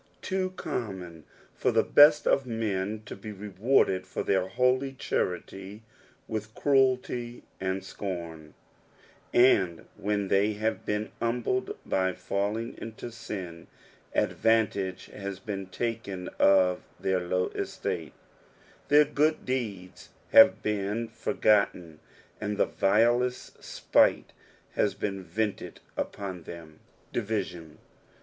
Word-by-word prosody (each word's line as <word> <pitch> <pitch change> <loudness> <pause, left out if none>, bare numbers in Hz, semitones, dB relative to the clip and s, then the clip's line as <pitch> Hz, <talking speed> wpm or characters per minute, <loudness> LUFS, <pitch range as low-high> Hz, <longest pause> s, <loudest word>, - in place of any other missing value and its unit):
too 190 -1 -1
amimxmfor 90 - -4
the - - +3
beat 150 +1 +7
of 135 -2 +2
men 110 -2 -2
to - - -7
be 105 +2 -8
rfuurdsd 100 0 +1
for - - -3
Ouir 95 -1 +1
holy 130 +5 +1
charily 95 -3 -3 0.5
leilh 110 -1 -3
cradty 130 -3 +1 0.2
and 95 0 -2
scorn; 85 -6 -6 0.8
and 95 -9 +4
lo/if 105 - -2
n 100 -1 0
they 100 +2 +3
haue 110 +2 0
betn 105 +1 -1
humbled 120 +2 -1
by 95 -1 +1
falling 105 +6 -2
into 115 +1 -7
sin, 95 -7 -7 0.5
adoantagt 105 -4 +1
has 100 -1 -6
been 95 0 -5
taken 100 -3 -4
of 95 -2 +4 0.2
their 95 -1 +1
lorn 90 +1 -1
etiale, - - -4 0.8
their 150 +1 +6
good 150 +2 +1
deeds 100 -8 -4 0.2
have - - +8
been 105 +2 -1
for - - -4
gotten 90 -7 +2 0.4
and 105 -1 -2
the - - +4
vilest 120 +5 +1
sj^e - - +2 0.5
has 100 -2 0
been 100 -1 -3
vented 105 +4 -3 0.2
upon 95 -3 -4
them. 80 -1 -11 0.3
DivmiDN. 95 -8 -3
105 Hz, 115 wpm, -28 LUFS, 95-115 Hz, 0.8 s, have